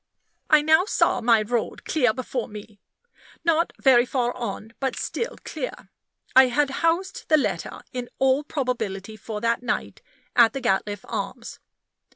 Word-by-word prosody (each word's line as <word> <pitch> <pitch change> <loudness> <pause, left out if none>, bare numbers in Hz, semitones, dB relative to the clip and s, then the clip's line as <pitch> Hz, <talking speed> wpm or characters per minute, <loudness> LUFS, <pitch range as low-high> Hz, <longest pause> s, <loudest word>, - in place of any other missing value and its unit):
I 305 -2 +6
now 315 +4 +5
saw 425 - +2
my 230 -2 +4
road 235 +1 -3
clear 255 -8 +2
before 250 +1 -4
me 210 -1 -11 0.6
not 335 0 +2
very 255 -3 +6
far 245 -2 -1
on, 225 -2 -5
but 265 -1 -1
still 465 - -3
clear. - - -6 0.4
I 260 0 +8
had 280 +3 +1
housed 340 +4 0
the 310 - +6
letter, 290 - -2
in 250 -1 -4
all 265 +2 +3
probability 220 -8 -3
for 215 0 -6
that 230 +1 +1
night, 245 -1 -3 0.3
at 235 -1 +6
the 270 - -3
Gatliffe 205 -4 -1
Arms. - - -5
250 Hz, 150 wpm, -24 LUFS, 225-295 Hz, 0.6 s, I